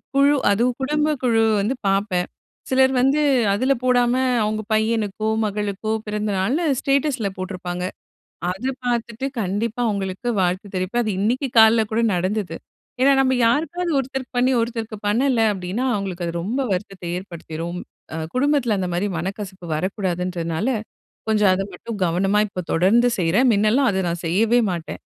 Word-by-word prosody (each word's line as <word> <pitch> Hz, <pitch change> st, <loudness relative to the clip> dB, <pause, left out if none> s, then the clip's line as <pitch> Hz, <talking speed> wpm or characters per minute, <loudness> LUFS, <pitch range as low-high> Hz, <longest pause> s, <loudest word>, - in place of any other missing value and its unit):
குழு 280 Hz, +1 st, +5 dB, 0.2 s
அதுவும் 240 Hz, +4 st, +1 dB
குடும்ப 300 Hz, +2 st, +1 dB
குழு 225 Hz, -2 st, +3 dB, 0.2 s
வந்து 225 Hz, +7 st, 0 dB
பார்ப்பேன். 195 Hz, -2 st, +1 dB, 0.4 s
சிலர் 265 Hz, 0 st, +4 dB
வந்து 270 Hz, +4 st, +3 dB, 0.3 s
அதுல 260 Hz, +6 st, +2 dB
போடாம, 245 Hz, -1 st, +3 dB, 0.3 s
அவங்க 215 Hz, +1 st, -1 dB
பையனுக்கோ 215 Hz, -1 st, 0 dB, 0.2 s
மகளுக்கோ 210 Hz, +1 st, -2 dB
பிறந்தநாள்னு 210 Hz, -, -1 dB, 0.2 s
ஸ்டேட்டஸ்ல 275 Hz, -5 st, +1 dB
போட்ருப்பாங்க. 180 Hz, -1 st, -5 dB, 0.7 s
அது 210 Hz, +8 st, -4 dB, 0.2 s
பார்த்துட்டு 235 Hz, 0 st, -2 dB, 0.2 s
கண்டிப்பா 210 Hz, +5 st, -2 dB
அவங்களுக்கு 195 Hz, +2 st, -3 dB
வாழ்த்து 185 Hz, +3 st, -1 dB
தெரிவிப்பேன். 185 Hz, +7 st, 0 dB
அது 215 Hz, -, -1 dB
இன்னிக்கு 250 Hz, +7 st, 0 dB
காலைல 220 Hz, 0 st, +6 dB
கூட 225 Hz, -, +1 dB
நடந்தது. 185 Hz, -1 st, -2 dB, 0.5 s
ஏன்னா 275 Hz, +2 st, +6 dB
நம்ம 260 Hz, -1 st, +2 dB
யாருக்காவது 325 Hz, +8 st, 0 dB
ஒருத்தருக்கு 265 Hz, -1 st, -4 dB
பண்ணி 250 Hz, +1 st, +3 dB
ஒருத்தருக்கு 230 Hz, -2 st, -3 dB
பண்ணல 240 Hz, +2 st, +2 dB
அப்டின்னா, 190 Hz, +7 st, -3 dB
அவங்களுக்கு 190 Hz, -3 st, -3 dB
அது 170 Hz, -, -3 dB
ரொம்ப 230 Hz, +9 st, -2 dB
வருத்தத்த 190 Hz, 0 st, -4 dB
ஏற்படுத்திரும். 170 Hz, -2 st, -6 dB, 0.6 s
குடும்பத்துல 260 Hz, -5 st, +2 dB
அந்த 185 Hz, -, -1 dB
மாதிரி 180 Hz, +4 st, 0 dB
மனக்கசப்பு 190 Hz, +1 st, -5 dB
வரக்கூடாதுன்றதுனால 180 Hz, 0 st, -2 dB, 0.6 s
கொஞ்சம் 210 Hz, -3 st, +4 dB
அத 190 Hz, -, -1 dB
மட்டும் 210 Hz, +4 st, -7 dB
கவனமா 195 Hz, +4 st, +1 dB
இப்ப 185 Hz, -2 st, -5 dB
தொடர்ந்து 220 Hz, +9 st, +4 dB
செய்றேன். 185 Hz, +9 st, +3 dB
முன்னல்லாம் 215 Hz, +6 st, +3 dB
அது 190 Hz, -, -1 dB
நான் 170 Hz, 0 st, -3 dB
செய்யவே 220 Hz, +8 st, +3 dB
மாட்டேன். 170 Hz, -3 st, -5 dB
215 Hz, 135 wpm, -22 LUFS, 185-245 Hz, 0.7 s, காலைல